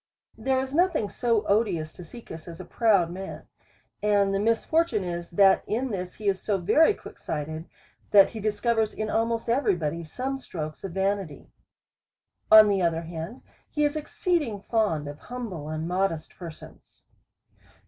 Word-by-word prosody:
There 265 Hz, -1 st, +1 dB
is 265 Hz, +1 st, -4 dB
nothing 335 Hz, -, +2 dB
so 230 Hz, -3 st, 0 dB
odious 195 Hz, -7 st, +1 dB
to 180 Hz, -, -10 dB
Caecus 165 Hz, -4 st, -11 dB
as 170 Hz, -1 st, -9 dB
a -, -, -7 dB
proud 200 Hz, -7 st, +2 dB
man; 190 Hz, +2 st, -7 dB, 0.6 s
and 205 Hz, -1 st, +3 dB
the 195 Hz, -, +1 dB
misfortune 230 Hz, -, +1 dB
is, 175 Hz, -1 st, -4 dB
that 195 Hz, +2 st, +5 dB
in 245 Hz, +4 st, -1 dB
this 180 Hz, -2 st, -4 dB
he 215 Hz, -, -6 dB
is 195 Hz, -1 st, +1 dB
so 205 Hz, -2 st, 0 dB
very 300 Hz, -, +4 dB
quick -, -, -12 dB
sighted, 155 Hz, +2 st, -5 dB, 0.4 s
that 200 Hz, -2 st, +7 dB
he 225 Hz, -, -6 dB
discovers 215 Hz, +1 st, 0 dB
in 215 Hz, 0 st, -3 dB
almost 230 Hz, 0 st, 0 dB
every 235 Hz, -4 st, +2 dB
body 165 Hz, 0 st, -3 dB
some 260 Hz, -, -4 dB
strokes 155 Hz, -10 st, -6 dB
of 190 Hz, -3 st, -5 dB
vanity. 195 Hz, -5 st, -2 dB, 1.0 s
On 215 Hz, 0 st, +10 dB
the 200 Hz, -2 st, +2 dB
other 165 Hz, -1 st, +1 dB
hand, 165 Hz, +7 st, -7 dB, 0.3 s
he 300 Hz, -, 0 dB
is 295 Hz, +1 st, +1 dB
exceeding 305 Hz, -, -1 dB
fond 205 Hz, -12 st, 0 dB
of 145 Hz, +1 st, -8 dB
humble 210 Hz, -12 st, -6 dB
and 155 Hz, +1 st, -3 dB
modest 180 Hz, -3 st, -1 dB
persons. 170 Hz, -3 st, -12 dB
200 Hz, 160 wpm, -26 LUFS, 170-230 Hz, 1.0 s, On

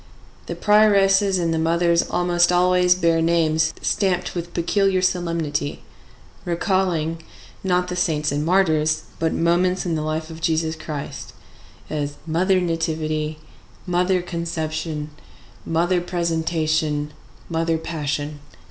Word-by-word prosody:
The -, -, -4 dB
prioresses 200 Hz, -2 st, +4 dB
and 170 Hz, -2 st, 0 dB
the 160 Hz, -, 0 dB
mothers 170 Hz, +1 st, +2 dB
almost 175 Hz, 0 st, +2 dB
always 180 Hz, 0 st, +4 dB
bear 165 Hz, -2 st, +2 dB
names 160 Hz, -1 st, +2 dB
stamped 185 Hz, -3 st, 0 dB
with 175 Hz, -1 st, -5 dB
peculiar 195 Hz, +2 st, +2 dB
solemnity, 170 Hz, -5 st, -1 dB, 0.6 s
recalling, 170 Hz, -2 st, 0 dB, 0.4 s
not 180 Hz, -1 st, +1 dB
the 180 Hz, -, -4 dB
saints 155 Hz, -4 st, 0 dB
and 145 Hz, +1 st, -1 dB
martyrs, 160 Hz, -3 st, +2 dB, 0.2 s
but 160 Hz, 0 st, +1 dB
moments 180 Hz, +3 st, +1 dB
in 170 Hz, -, -1 dB
the 155 Hz, -, -1 dB
life 155 Hz, +1 st, -3 dB
of 160 Hz, 0 st, -10 dB
Jesus 160 Hz, -1 st, 0 dB
Christ: 150 Hz, -2 st, -7 dB, 0.5 s
as 145 Hz, -1 st, -3 dB
Mother 185 Hz, +4 st, +2 dB
Nativity, 155 Hz, -3 st, -2 dB, 0.5 s
Mother 180 Hz, 0 st, +1 dB
Conception, 160 Hz, -3 st, -4 dB, 0.6 s
Mother 175 Hz, +2 st, +1 dB
Presentation, 160 Hz, -3 st, -1 dB, 0.3 s
Mother 165 Hz, 0 st, 0 dB
Passion. 150 Hz, -2 st, -3 dB
165 Hz, 115 wpm, -22 LUFS, 155-180 Hz, 0.6 s, prioresses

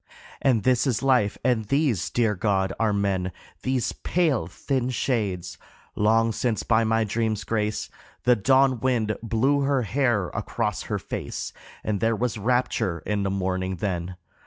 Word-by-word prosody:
And 120 Hz, -6 st, +3 dB
this 125 Hz, +3 st, +3 dB
is 125 Hz, -1 st, 0 dB
life 125 Hz, -6 st, +3 dB
and 120 Hz, -4 st, +1 dB
these, 140 Hz, -, +1 dB
dear 115 Hz, -3 st, +1 dB
God, 95 Hz, -1 st, 0 dB
are 110 Hz, -2 st, +2 dB
men, 95 Hz, -2 st, 0 dB, 0.3 s
These 130 Hz, -2 st, 0 dB
pale, 155 Hz, -, 0 dB
thin 130 Hz, +7 st, -2 dB
shades! 95 Hz, -9 st, -2 dB, 0.4 s
Long 115 Hz, +2 st, +3 dB
since 115 Hz, 0 st, -1 dB
by 115 Hz, 0 st, +3 dB
my 110 Hz, 0 st, +2 dB
dream's 110 Hz, 0 st, -1 dB
grace 105 Hz, -1 st, -1 dB, 0.4 s
The 125 Hz, 0 st, +5 dB
dawn 130 Hz, +3 st, +3 dB
wind 115 Hz, -4 st, +1 dB
blew 115 Hz, +5 st, +2 dB
her 140 Hz, -2 st, +1 dB
hair 115 Hz, -4 st, +1 dB
across -, -, -2 dB
her -, -, 0 dB
face, -, -, -5 dB, 0.3 s
And 105 Hz, -2 st, -1 dB
there 115 Hz, +2 st, +2 dB
was 115 Hz, -1 st, -2 dB
rapture 110 Hz, -6 st, 0 dB
in 105 Hz, -1 st, 0 dB
the 100 Hz, -, 0 dB
morning 95 Hz, -1 st, -1 dB
then. 90 Hz, -1 st, -3 dB
110 Hz, 155 wpm, -25 LUFS, 100-125 Hz, 0.4 s, The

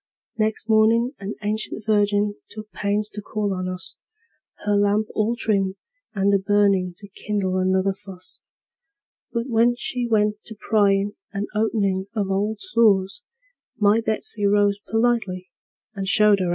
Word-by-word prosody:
Next 220 Hz, 0 st, -1 dB
mornin' 225 Hz, +2 st, +4 dB
an 200 Hz, +2 st, -5 dB
ancient 215 Hz, 0 st, -3 dB
virgin 205 Hz, -1 st, +2 dB, 0.2 s
took 215 Hz, 0 st, -10 dB
pains 205 Hz, +1 st, 0 dB
to 210 Hz, -, -7 dB
call 205 Hz, -1 st, -2 dB
on 185 Hz, 0 st, -3 dB
us, 185 Hz, 0 st, -6 dB, 0.7 s
Her 205 Hz, 0 st, +2 dB
lamp 205 Hz, +1 st, +2 dB
all 220 Hz, +2 st, 0 dB
trimmed 195 Hz, -5 st, 0 dB, 0.4 s
and 200 Hz, 0 st, +2 dB
a 200 Hz, -, +4 dB
burnin' 195 Hz, -2 st, +2 dB
to 200 Hz, -, -9 dB
kindle 195 Hz, -2 st, -2 dB
another 190 Hz, +1 st, +1 dB
fuss; 190 Hz, -2 st, -11 dB, 0.9 s
But 235 Hz, +1 st, -2 dB
when 235 Hz, 0 st, +3 dB
she 245 Hz, 0 st, -3 dB
went 210 Hz, -2 st, +1 dB
to 220 Hz, -, -6 dB
pryin' 205 Hz, -2 st, +2 dB, 0.2 s
and 200 Hz, +1 st, -3 dB
openin' 200 Hz, -3 st, 0 dB
of 200 Hz, -3 st, -1 dB
old 205 Hz, +3 st, -1 dB
sores, 215 Hz, -, +2 dB, 0.6 s
My 210 Hz, +2 st, +3 dB
Betsey 215 Hz, -1 st, 0 dB
rose 205 Hz, 0 st, +3 dB
politely, 225 Hz, -6 st, 0 dB, 0.4 s
and 195 Hz, -2 st, -4 dB
showed 210 Hz, -, +3 dB
her 210 Hz, -, +6 dB
out -, -, +6 dB
of 200 Hz, -, +3 dB
doors. 180 Hz, -2 st, 0 dB
205 Hz, 155 wpm, -23 LUFS, 195-220 Hz, 0.9 s, her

